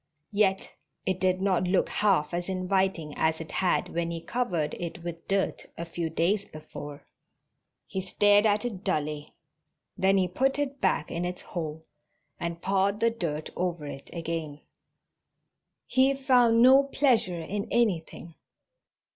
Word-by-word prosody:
Yet 200 -2 +1 0.3
it 185 -1 0
did 185 0 +1
not 185 -2 +2
look 185 +1 +2
half 190 -7 +2
as 175 +2 -2
inviting 185 -4 0
as 160 0 +1
it 165 - -8
had 185 -2 +1
when 170 0 -2
he 170 0 -4
covered 170 -4 -1
it 170 -1 -6
with 170 -1 -7
dirt 195 0 -1
a 170 - -4
few 165 0 -3
days 190 +6 0
before. 150 -2 -9 0.8
He 190 - -4
stared 205 +3 +4
at 210 +2 +1
it 210 -5 -4
dully. 150 -5 -2 0.6
Then 195 +1 +3
he 185 -1 +2
put 265 - 0
it 280 -1 -3
back 150 - +1
in 170 - -2
its 180 0 -4
hole 160 -2 -5 0.6
and 170 0 -4
pawed 195 +2 +1
the 230 +1 +3
dirt 160 -9 -4
over 175 -4 -2
it 135 -1 -8
again. 165 -3 -4 1.2
He 265 +1 +3
found 245 -4 +4
no 265 +2 +7
pleasure 245 -11 +2
in 200 +6 -4
anything. 175 -7 0
185 Hz, 145 wpm, -28 LUFS, 165-205 Hz, 1.2 s, no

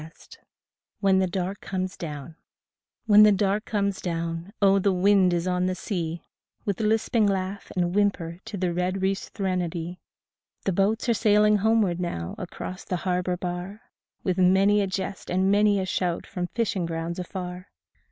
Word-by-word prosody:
13 160 +2 -14 0.6
WHEN 195 -2 +4
THE 190 - +2
DARK 185 +2 -3
COMES 185 -1 -3
DOWN 150 -1 -7 0.7
When 210 -2 +7
the 210 0 +8
dark 200 +2 +1
comes 200 -2 -1
down, 165 +1 -3
oh, 195 -1 +5
the 195 +1 +2
wind 190 0 +4
is 175 +1 0
on 180 0 +1
the 185 - -1
sea 170 -4 -4 0.4
With 200 -3 -1
lisping 220 0 +2
laugh 195 0 -2
and 175 -1 0
whimper 185 -4 0
to 205 - -6
the 180 -2 0
red 185 +2 -1
reef's 195 +1 -1
threnody, 180 -3 -3 0.7
The 195 - +1
boats 205 +6 +1
are 235 - +4
sailing 210 -1 +4
homeward 205 -4 +2
now 85 - -3
across 185 +1 -6
the 180 - -2
har 180 -1 +1
bor 180 0 -2
bar 180 +4 -5 0.4
With 185 -1 0
many 195 +3 +4
a 200 - 0
jest 190 0 -4
and 190 +2 +2
many 205 0 +4
a 190 - -1
shout 180 -2 -1
from 180 -1 -4
fishing 200 -5 -1
grounds 165 +1 -4
afar. 180 0 -6
185 Hz, 170 wpm, -26 LUFS, 175-200 Hz, 0.7 s, the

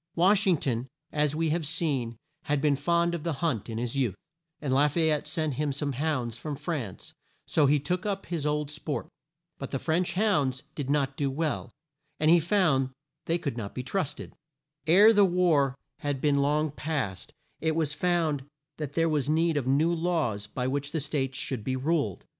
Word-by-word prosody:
Wash 195 +4 +4
ing 180 -3 +5
ton, 125 -2 -2 0.2
as 150 -1 +1
we 160 -1 +1
have 165 +1 0
seen, 140 -8 -1 0.3
had 145 0 +1
been 145 0 +3
fond 170 +4 +1
of 170 - -3
the 165 +1 -1
hunt 135 - -1
in 110 - -4
his 120 +2 -3
youth, 125 -8 +1 0.4
and 140 -3 -1
La 140 +3 +5
fay 160 +2 +2
ette 150 - -1
sent 155 -4 -1
him 150 +2 -1
some 145 +1 -2
hounds 130 -4 -2
from 150 +2 -4
France, 145 - -5 0.3
so 150 -3 +3
he 145 +1 +4
took 180 +6 -2
up 200 -2 -2
his 170 -4 -3
old 150 0 -1
sport. 150 0 -4 0.5
But 135 - -5
the - - -1
French 170 +6 0
hounds 150 -11 +1
did 140 -3 -4
not 140 -1 +1
do 140 -2 0
well, 150 +2 -2 0.5
and 155 +1 +4
he 175 - +7
found 160 -7 +2 0.4
they 165 - +1
could 140 -8 -4
not 100 -4 -5
be 125 - -3
trusted. 160 +1 -3 0.5
Ere 205 +7 +8
the 205 -1 +6
war 170 -8 +3 0.2
had 145 -2 -2
been 140 0 +2
long 150 +2 +1
past, 135 - -3 0.3
it 160 -1 0
was 155 -3 0
found 165 -5 +1 0.3
that 150 -3 -5
there 165 +1 +2
was 150 -3 0
need 165 +1 +2
of 140 -4 -1
new 150 +6 +3
laws 160 -12 -1
by 125 - -3
which 140 +2 -2
the 160 - +1
States 140 -3 -2
should 125 -6 -2
be 130 +4 -1
ruled. 135 - -1
150 Hz, 195 wpm, -28 LUFS, 135-165 Hz, 0.5 s, Ere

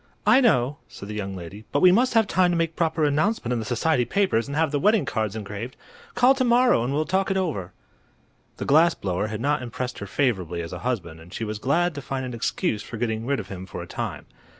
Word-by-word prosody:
"I 260 - +6
know," 140 - +2
said 100 - -10
the - - -4
young 100 -2 -4
lady, 95 +4 -9
"but 145 - +2
we 185 - +8
must 240 +5 +3
have 225 -1 +5
time 185 -2 +2
to 175 - +1
make 165 -1 -1
proper 160 -1 0
announcement 150 - +1
in 120 - -1
the 110 - -4
society 125 +4 +1
papers 185 - +1
and 140 +1 -4
have 160 -2 +2
the 145 - 0
wedding 210 0 +3
cards 110 -6 -2
engraved. 105 +3 -6 0.4
Call 255 +2 +6
to 265 -1 0
morrow 245 - +4
and 125 - -2
we'll 150 +3 0
talk 190 +3 0
it 195 - +1
over." 135 - -2 0.9
The - - -4
glass 160 +5 +5
blower 95 +2 -2
had 110 +1 -5
not 145 +1 +1
impressed 125 +1 -5
her 100 - -6
favorably 95 - -1
as 85 - -7
a 90 - -5
husband, 90 -9 -3
and 85 +2 -15
she 115 - -5
was 105 -1 -4
glad 170 +8 +1
to 145 - -6
find 130 0 -4
an 125 - -6
excuse 110 -2 -1
for 115 - -8
getting 110 0 -2
rid 140 -1 +1
of - - -7
him 95 -1 -7
for - - -6
a - - -8
time. - - -5
130 Hz, 245 wpm, -24 LUFS, 105-170 Hz, 0.9 s, we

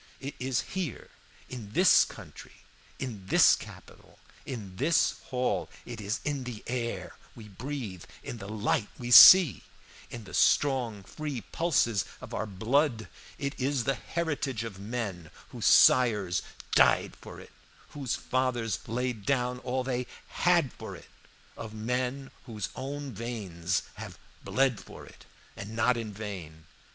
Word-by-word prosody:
It 140 +1 -6
is 125 -2 0
here, 180 - -5 0.4
in 110 -5 -9
this 180 -2 +6
country, - - -13 0.3
in 110 -8 -6
this - - +6
capital, - - -13 0.3
in 100 -7 -7
this 155 +5 +2
hall, 115 -9 -1 0.2
it 115 -2 -7
is 105 +3 -3
in 145 -3 -2
the 120 -4 -7
air 120 -1 -4 0.2
we 110 -2 -11
breathe, 115 - -6 0.2
in 120 - -7
the 100 - -8
light 105 0 0
we 120 -1 -5
see, 155 - +10 0.5
in 120 - -8
the 95 - -13
strong, 125 -8 +2
free 145 +3 -5
pulses 115 - +1 0.2
of - - -10
our 110 - -2
blood; 110 - 0 0.3
it 140 0 -3
is 135 -1 0
the 135 - +1
heritage 145 -7 -3
of 105 -5 -7
men 100 -6 -5 0.2
whose - - -2
sires 105 -8 +5 0.3
died - - +4
for - - -10
it, - - -14 0.4
whose 135 -5 -3
fathers 125 -3 -1
laid 120 -1 -2
down 125 0 0
all 130 0 -2
they 125 -1 -2 0.2
had 170 -7 +2
for - - -8
it, - - -14 0.5
of 110 -1 -8
men 125 +4 -2 0.2
whose 105 -5 -5
own 140 +1 -5
veins 100 -7 -3 0.2
have - - -8 0.3
bled 130 -4 +1
for - - -12
it - - -17 0.3
and 105 +2 -8
not 120 +2 +3
in 115 -2 -5
vain. 95 -7 -8
120 Hz, 145 wpm, -29 LUFS, 105-135 Hz, 0.5 s, see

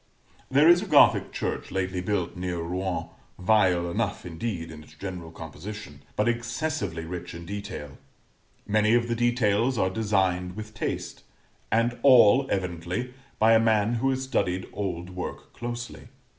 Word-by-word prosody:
There 140 +4 +5
is 175 +1 +7
a 210 - -5
Gothic 150 -6 +5
church - - -3
lately 95 -1 -2
built 90 -2 -1
near 90 -1 -3
Rouen, 90 +2 -3 0.3
vile 90 -3 +3
enough, - - -2
indeed, 85 -1 -4
in 75 -1 -10
its 75 - -18
general 90 0 -6
composition, 80 0 -9
but 105 - +1
excessively 120 - -2
rich 85 0 -6
in 85 0 -8
detail; 95 -7 -7 0.7
many 110 +2 +3
of 120 0 +2
the 120 - 0
details 120 0 +2
are 95 -2 +1
designed 95 -4 0
with 110 0 -8
taste, - - -4 0.5
and 115 +2 +1
all 130 0 +7
evidently 90 +6 -2 0.2
by 110 +1 +5
a 110 - +6
man 110 0 +2
who 135 - +2
has 130 0 -1
studied 95 -8 -1
old 90 -3 -4
work 90 0 -7
closely. 120 0 -6
100 Hz, 150 wpm, -26 LUFS, 90-120 Hz, 0.7 s, is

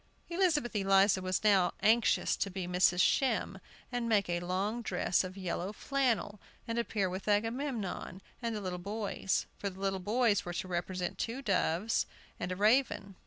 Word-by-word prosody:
Elizabeth 340 - +1
Eliza 195 -1 +4
was 185 +1 -1
now 195 -4 +4
anxious 225 +1 +3
to 200 - -1
be 185 -1 -4
Mrs. 180 0 +3
Shem, 225 -6 +1 0.3
and 240 -2 -2
make 205 -3 +3
a 175 0 0
long 190 +6 -2
dress 180 -4 +1
of 185 +1 -7
yellow 185 0 -3
flannel, 230 -5 -1 0.3
and 230 0 -1
appear 210 -4 0
with 185 +2 -5
Agamemnon 225 -3 -1 0.2
and 230 -2 -2
the 210 - -4
little 180 -2 -4
boys. 200 0 -2
For 200 - -2
the 190 0 -12
little 195 -1 -1
boys 215 +1 +2
were 175 - -5
to 180 - -3
represent 180 0 -3
two 245 +4 -3
doves 195 0 +1 0.3
and 180 - -3
a - - -1
raven. 210 -1 +2
200 Hz, 165 wpm, -32 LUFS, 185-230 Hz, 0.3 s, Eliza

